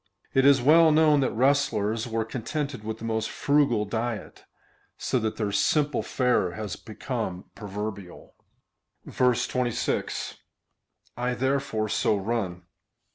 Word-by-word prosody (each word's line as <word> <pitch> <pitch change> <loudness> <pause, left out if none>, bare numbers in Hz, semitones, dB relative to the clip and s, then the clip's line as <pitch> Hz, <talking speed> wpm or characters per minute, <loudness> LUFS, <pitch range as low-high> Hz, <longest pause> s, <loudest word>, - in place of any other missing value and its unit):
It 135 +1 +4
is 135 -3 +5
well 160 +3 +6
known 155 -1 +5
that 130 - +2
wrestlers 115 -4 +1
were 115 -1 -1
contented 130 +2 -4
Avith 110 +1 -5
the 115 - -8
most 110 -1 -1
frugal 140 -7 +2
diet, 115 +1 -4 0.5
so 130 - 0
that 110 -1 -2
their 105 -2 -1
simple 150 +7 +2
fare 125 -9 +1
has 105 -1 -5
become 110 -4 -5
proverbial. 100 -2 -7 0.8
26. 125 -1 0 0.5
/ - - -39
therefore 125 -1 -1
so 105 0 +1
run. 95 -4 -3
115 Hz, 120 wpm, -26 LUFS, 110-135 Hz, 0.8 s, well